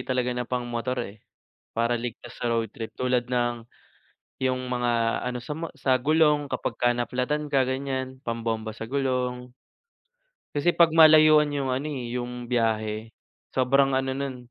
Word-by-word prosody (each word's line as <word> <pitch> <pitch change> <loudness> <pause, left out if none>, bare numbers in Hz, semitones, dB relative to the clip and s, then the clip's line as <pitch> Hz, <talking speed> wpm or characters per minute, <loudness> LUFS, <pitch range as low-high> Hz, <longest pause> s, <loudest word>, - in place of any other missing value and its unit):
talaga 125 -1 -1
na 125 -1 -4
pang-motor, 125 0 -2
eh, 100 0 -11 0.6
para 115 +1 +2
ligtas 120 0 -7
sa 120 - 0
road 115 -2 -1
trip. 115 -1 -6
Tulad 125 -1 0
ng, 120 -2 -1 0.8
yung 130 -1 0
mga 120 -2 0
ano, 125 0 -3
sa 150 +5 -6
mo 165 +1 -4
sa 130 -1 +3
gulong 150 0 +3
kapag - - -2
ka 120 - +4
na-flat-tan 125 +5 -1
ka, 140 -2 +3
ganyan, 130 0 -3
pambomba 115 -1 -3
sa 115 - -7
gulong. 125 -2 -1 1.0
Kasi, 145 +4 +1
'pag 165 -2 +5
malayuan 155 -1 +7
yung 135 -2 -1
ano 135 +4 -2
eh, 125 -5 -5
yung 125 0 -6
biyahe, 110 -2 -1 0.5
sobrang 135 +1 +3
ano 135 0 0
no'n, 135 -1 -3
125 Hz, 155 wpm, -26 LUFS, 120-135 Hz, 1.0 s, malayuan